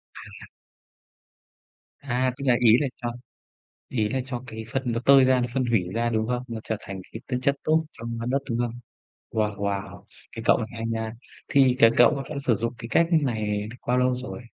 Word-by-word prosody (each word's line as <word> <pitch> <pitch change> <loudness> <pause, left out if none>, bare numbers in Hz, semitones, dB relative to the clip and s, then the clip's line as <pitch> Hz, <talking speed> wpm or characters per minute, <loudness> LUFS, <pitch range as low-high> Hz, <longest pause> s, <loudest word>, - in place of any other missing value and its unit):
À. - - -11 1.5
À, 130 -2 -1
tức 140 - -6
là 125 - +5
ý 120 - +5
là 145 - 0
cho 120 -2 -4 0.8
ý 110 -4 0
là 130 - -1
cho 130 -1 -5
cái 110 -1 -7
phân 135 -1 0
nó 115 - -1
tơi 135 -1 +7
ra, 130 -1 +4
nó 120 - 0
phân 130 -2 +1
hủy 115 -5 +2
ra, 120 +1 0
đúng 110 -1 0
không? 125 0 -1
Nó 115 -2 -5
trở 110 - -2
thành 95 -2 -7
cái 110 - -8
tinh 125 -1 -1
chất 140 +2 +2
tốt 160 +1 +2
cho, 115 - -10 0.2
ơ, - - -3
đất, 135 - +2
đúng 115 - 0
không? 120 0 -2 0.5
Wow, 105 -2 0
wow, 100 -1 -4 0.3
cái - - -7
cậu - - +5
này 110 - -3
hay 115 -1 -5
nha. 110 -1 -3 0.3
Thì 135 -3 +4
cái 115 - +8
cậu 120 - +7
v 135 - -5
vẫn 145 -2 -4
sử 125 -5 +2
dụng 115 +3 -2
cái 115 - -7
cách 165 - +4
như 165 - +6
này 105 -3 -2 0.2
bao 125 - +2
lâu 125 0 +2
rồi? 125 -1 -7
120 Hz, 225 wpm, -25 LUFS, 110-130 Hz, 1.5 s, cái